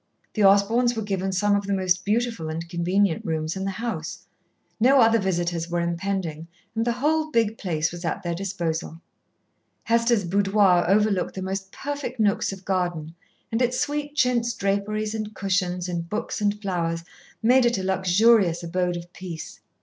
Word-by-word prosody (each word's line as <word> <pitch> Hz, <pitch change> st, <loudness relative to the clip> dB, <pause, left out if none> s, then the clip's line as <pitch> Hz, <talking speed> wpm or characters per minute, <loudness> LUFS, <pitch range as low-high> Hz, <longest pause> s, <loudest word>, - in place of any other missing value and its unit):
The 215 Hz, -, +1 dB
Osborns 220 Hz, +5 st, +4 dB
were 220 Hz, -, -2 dB
given 195 Hz, -2 st, -2 dB
some 205 Hz, +2 st, +2 dB
of 200 Hz, -1 st, -1 dB
the 200 Hz, -, +1 dB
most 185 Hz, -1 st, +1 dB
beautiful 225 Hz, -6 st, -1 dB
and 165 Hz, +1 st, -4 dB
convenient 180 Hz, +1 st, +1 dB
rooms 160 Hz, 0 st, -2 dB
in 190 Hz, 0 st, -3 dB
the -, -, -1 dB
house. 185 Hz, -5 st, -5 dB, 0.5 s
No 265 Hz, +4 st, +5 dB
other 230 Hz, -1 st, +5 dB
visitors 175 Hz, -3 st, -1 dB
were 175 Hz, 0 st, -1 dB
impending 170 Hz, -2 st, -2 dB, 0.3 s
and 225 Hz, +1 st, -1 dB
the 235 Hz, -, +2 dB
whole 310 Hz, +5 st, +1 dB
big 225 Hz, -6 st, +1 dB
place 165 Hz, -4 st, -1 dB
was 175 Hz, +1 st, -8 dB
at 175 Hz, +3 st, -2 dB
their 170 Hz, -1 st, -2 dB
disposal. 170 Hz, -3 st, -3 dB, 0.8 s
Hester's 230 Hz, -2 st, +2 dB
boudoir 195 Hz, -1 st, +3 dB
overlooked 200 Hz, -1 st, +2 dB
the 190 Hz, -, -4 dB
most 190 Hz, 0 st, -4 dB
perfect 280 Hz, -3 st, -5 dB
nooks 205 Hz, -2 st, +2 dB
of 190 Hz, -1 st, -10 dB
garden, 175 Hz, -4 st, -2 dB, 0.4 s
and 225 Hz, +2 st, 0 dB
its 250 Hz, 0 st, +1 dB
sweet 290 Hz, 0 st, -2 dB
chintz 240 Hz, -4 st, +2 dB
draperies 210 Hz, +2 st, -1 dB
and 215 Hz, -1 st, -5 dB
cushions 180 Hz, -2 st, -1 dB
and 170 Hz, -1 st, -4 dB
books 215 Hz, +1 st, -3 dB
and 205 Hz, 0 st, +1 dB
flowers 170 Hz, -4 st, -2 dB, 0.4 s
made 250 Hz, +2 st, +5 dB
it 240 Hz, -2 st, +1 dB
a 190 Hz, -, -3 dB
luxurious 190 Hz, -1 st, +3 dB
abode 180 Hz, +1 st, -1 dB
of 175 Hz, +1 st, -10 dB
peace. 175 Hz, -4 st, -8 dB
195 Hz, 170 wpm, -24 LUFS, 175-225 Hz, 0.8 s, No